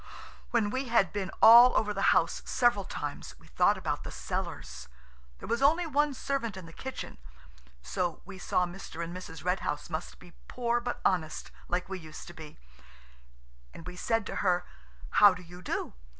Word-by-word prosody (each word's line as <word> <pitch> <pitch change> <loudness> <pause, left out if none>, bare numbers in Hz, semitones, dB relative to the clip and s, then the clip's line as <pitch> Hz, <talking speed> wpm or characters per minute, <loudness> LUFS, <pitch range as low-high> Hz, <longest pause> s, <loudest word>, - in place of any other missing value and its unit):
When 220 -3 +1
we 260 +3 -2
had 225 -7 +3
been 200 -2 -2
all 240 +2 +9
over 210 -1 +1
the 195 0 +2
house - - +2
several 240 -6 +2
times, 145 -4 -6
we - - -20
thought - - +2
about - - -3
the - - -6
cellars. 65 0 -5 0.5
There - - -9
was 235 +2 0
only 320 +5 +4
one 295 -2 +1
servant 240 -8 -2
in 185 - -8
the 165 - -13
kitchen 265 - -7 0.6
(so 175 - -2
we 190 0 -10
saw 180 0 +1
Mr. 175 -2 -7
and 170 +1 -6
Mrs. 165 -3 -9
Red 180 +1 +1
House 150 0 -4
must 160 - -5
be 175 -1 -16
poor 240 -1 0
but 245 0 -4
honest, 160 -5 0 0.2
like 180 +1 -1
we 190 -1 -5
used 155 -2 -10
to - - -10
be), 155 -3 -11 1.2
and 165 - -10
we 180 - -7
said 225 +3 0
to - - -5
her– 180 -2 +1 0.5
"How 205 -2 +8
do 180 - -10
you 180 +1 -12
do? 175 - -3
190 Hz, 185 wpm, -30 LUFS, 175-235 Hz, 1.2 s, all